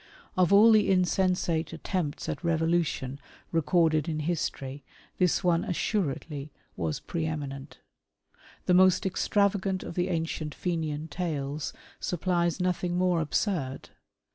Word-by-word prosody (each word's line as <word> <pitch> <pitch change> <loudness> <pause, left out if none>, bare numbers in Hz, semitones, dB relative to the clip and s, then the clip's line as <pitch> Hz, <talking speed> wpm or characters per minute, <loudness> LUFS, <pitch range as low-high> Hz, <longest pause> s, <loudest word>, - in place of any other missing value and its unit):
Of 185 0 +3
all 210 +3 +8
the 215 -2 +5
insensate 180 -3 +1
attempts 165 -2 -3
at - - -4
revolution 160 -5 0 0.3
recorded 165 -1 +2
in 155 -1 -2
history, 145 -4 -3 0.4
this 180 -2 +2
one 170 -2 +3
assuredly 155 -7 -2 0.2
was 80 -3 -2
preeminent. 145 -4 -4 0.9
The 180 - +3
most 185 +2 +5
extra 200 +2 +2
vagant 190 -2 -2
of - - -6
the 175 +1 0
ancient 160 -3 -2
Fenian 160 -3 -2
tales 150 -3 -3 0.3
supplies 175 0 0
nothing 180 -1 0
more 180 -2 +2
absurd. 155 -4 -1
170 Hz, 115 wpm, -28 LUFS, 150-185 Hz, 0.9 s, all